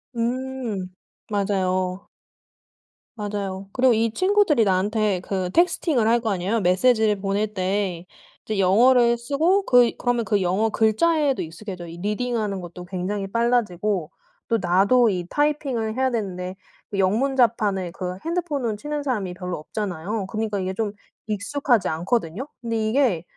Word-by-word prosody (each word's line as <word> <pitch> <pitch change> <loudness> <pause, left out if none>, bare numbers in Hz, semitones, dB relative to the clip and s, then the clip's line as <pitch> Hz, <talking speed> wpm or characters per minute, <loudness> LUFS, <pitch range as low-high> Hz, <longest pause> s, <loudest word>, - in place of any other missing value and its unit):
음. 240 -4 -2 0.4
맞아요. 185 -2 -1 1.1
맞아요. 200 -2 -4
그리고 255 -2 +4
이 225 0 +1
친구들이 370 - +3
나한테 200 0 +1
그 185 -2 -2
texting을 310 - +2
할 235 +1 +4
거 225 - -1
아니에요. 195 +4 0
메시지를 210 +3 +3
보낼 200 +2 -1
때 185 -2 -2 0.4
이제 215 -2 -2
영어를 235 +5 +5
쓰고 315 +11 +1
그 245 -2 +5
그러면 245 -2 0
그 205 -3 +1
영어 195 +5 +1
글자에도 275 +7 +2
익숙해져요. 175 +1 -7
이 165 - -9
reading하는 210 -1 -2
것도 175 +1 -9
굉장히 190 +2 -3
빨라지고 210 -5 0 0.4
또 230 - +3
나도 200 +7 +4 0.2
typing을 280 -7 0
해야 260 0 +2
되는데 185 -4 -3 0.4
그 200 - -2
영문 225 +9 +2
자판을 210 -7 +1
그 180 0 -5
핸드폰으로 310 -9 -1
치는 295 +6 -4
사람이 210 -10 -2
별로 180 0 -5
없잖아요. 190 +3 -4
그니까 215 -1 -2
이게 185 0 -2
좀 215 0 -1 0.3
익숙하지 225 0 0
않거든요. 175 - -1
근데 230 -1 -2
이게 225 - +2
215 Hz, 355 characters per minute, -23 LUFS, 190-245 Hz, 1.1 s, 영어를